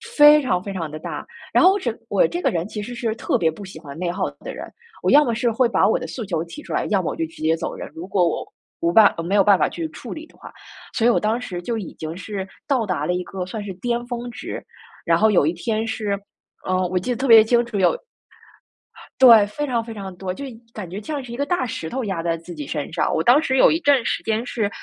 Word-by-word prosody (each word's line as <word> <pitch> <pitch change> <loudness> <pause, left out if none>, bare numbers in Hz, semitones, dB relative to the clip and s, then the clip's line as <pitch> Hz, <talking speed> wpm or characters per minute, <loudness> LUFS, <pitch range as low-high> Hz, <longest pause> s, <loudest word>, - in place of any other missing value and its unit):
非 295 0 +8
常 235 -10 0
非 200 0 -5
常 165 -4 -4
地 155 +1 -7
大。 - - -6 0.3
然 - - +5
后 370 - +8
我 400 - 0
整 375 - -3
我 - - +3
这 350 -4 -4
个 - - +2
人 170 0 -2
其 210 0 -5
实 240 +4 -6
是 230 -2 -2
特 - - 0
别 165 -2 +2
不 160 +6 -8
喜 185 -4 -10
欢 145 -3 -10
内 175 0 -1
耗 190 - -2
的 - - -6
人， - - -7 0.4
我 - - +2
要 295 +1 +7
么 235 - 0
是 235 +1 +1
会 240 +2 +3
把 - - +3
我 - - +3
的 - - -5
诉 240 - -5
求 170 -5 -2
提 170 - -10
出 - - -7
来， - - 0
要 200 -3 +2
么 170 - -2
我 - - -5
就 165 - -1
直 160 - -15
接 160 +1 +2
走 165 - -4
人， - - -7
如 170 +3 -7
果 185 -2 +2
我 165 - -2 0.4
无 170 - +2
办 215 0 +7
呃， 165 - -3
没 190 +4 -1
有 200 - +6
办 200 0 +5
法 - - +2
去 165 -2 -4
处 230 +9 -8
理 315 0 -8
的 - - -23
话。 - - -12 0.4
所 225 - +1
以 - - +6
我 240 - +3
当 220 +3 0
时 180 -8 -6
就 230 +5 -3
已 200 -6 -6
经 160 +1 -6
是 195 +1 -5 0.2
到 255 -6 +1
达 180 -3 -2
了 180 - 0
一 180 0 -2
个 185 -1 -5
算 210 +3 -6
是 195 -2 -6
巅 240 +4 -2
峰 240 0 -4
值， - - -7 0.4
然 170 -1 +4
后 220 +4 +4
有 180 - +4
一 160 - +1
天 220 +5 -2
是， 205 -3 -2 0.5
呃， 185 0 +1
我 185 0 0
记 250 +8 -3
得 240 - -1
特 270 - -1
别 225 -2 +9
清 235 +2 +2
楚， 235 -3 -4
有 190 - +3 1.2
对， 230 -5 +9
非 295 +9 -3
常 240 -4 -1
非 225 -1 -8
常 195 -3 -7
多， 185 +1 -4
就 280 +10 -6
一 260 - -8 0.2
感 200 -5 -6
觉 195 +4 -6
像 285 +4 -4
是 240 - -10
一 235 - -5
个 280 - -1
大 285 -2 0
石 165 -8 -5
头 260 +6 -3
压 190 -6 -2
在 165 0 -1
自 170 +2 -10
己 150 -4 -7
身 145 -2 -4
上。 - - +1
我 160 - +1
当 260 +5 +6
时 265 -5 0
有 - - +6
一 320 - +1
阵 285 -7 +3
时 - - -1
间 225 +1 -1
是， 220 -4 -1
210 Hz, 310 characters per minute, -22 LUFS, 180-240 Hz, 1.2 s, 别